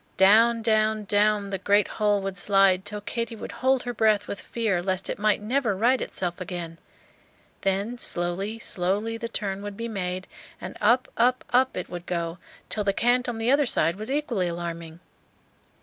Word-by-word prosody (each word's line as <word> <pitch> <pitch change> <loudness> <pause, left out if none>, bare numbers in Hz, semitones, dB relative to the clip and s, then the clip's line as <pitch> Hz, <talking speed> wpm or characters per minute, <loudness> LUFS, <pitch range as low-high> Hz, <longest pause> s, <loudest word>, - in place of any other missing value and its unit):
Down, 225 +4 +5
down, 215 -1 +2
down 205 0 +1
the 195 - -2
great 205 +1 +3
hull 205 -2 0
would 195 -1 -3
slide 195 0 +3
till 210 0 -4
Katy 230 +2 -4
would - - -7
hold 260 0 +1
her 245 - -4
breath 215 -2 +2
with 200 - -5
fear 215 -7 -1
lest 190 +1 0
it - - -6
might 210 0 +1
never 235 -2 0
right 245 +5 +2
itself 175 -1 -3
again; 175 -3 -6 0.8
then 200 +5 -1
slowly, 185 +5 0
slowly 205 +2 -1
the 230 0 -5
turn 200 -4 -3
would 205 -1 -7
be 230 - -4
made, 185 -4 -3 0.3
and - - -7
up, 235 +5 +3
up, 250 +2 +2
up 260 +1 +2
it 180 - -4
would 175 -1 -8
go, 170 -1 -3 0.3
till 210 - -1
the 200 -1 +1
cant 245 +3 +2
on 235 - -4
the 225 +3 +1
other 285 -1 +3
side 165 -6 +2
was 215 +4 -4
equally 265 -10 -1
alarming. 170 -1 -6
205 Hz, 180 wpm, -25 LUFS, 185-230 Hz, 0.8 s, Down